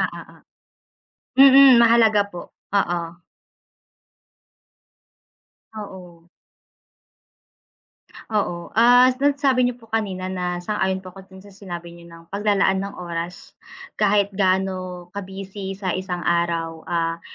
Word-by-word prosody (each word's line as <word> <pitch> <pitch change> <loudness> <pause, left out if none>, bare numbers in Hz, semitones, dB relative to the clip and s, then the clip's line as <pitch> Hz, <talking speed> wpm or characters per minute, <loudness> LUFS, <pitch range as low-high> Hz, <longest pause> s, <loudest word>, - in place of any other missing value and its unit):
ah, - - +1
oo. - - -12 1.0
Mmm, 270 -1 +8
mahalaga 225 -3 +4
po 175 - -7 0.3
oo. 175 -3 -1 2.6
Oo. 180 -5 -11 2.0
Oo, 175 -5 -2
ah, 245 +3 +5
sa 285 0 +2
sabi 260 -3 +2
niyo 245 - -5
po 230 - -19
kanina 190 -4 -3
na 180 -1 -4
sang-ayon 190 -2 -2
po 185 - -10
'ko 195 0 -14
din 190 0 -15
sa 200 - -15
sinabi 175 -3 -9
niyo 170 0 -15
ng 165 0 -14
pag-lalaan 200 -2 +1
ng 200 +1 -6
oras. 170 0 -7 0.5
Kahit 205 -1 +2
gaano 185 -2 -1
ka-busy 195 0 -7
sa 190 -3 -3
isang 180 -2 -4
araw, 170 -1 -1
ah, 165 0 -2
190 Hz, 115 wpm, -22 LUFS, 175-210 Hz, 2.6 s, Mmm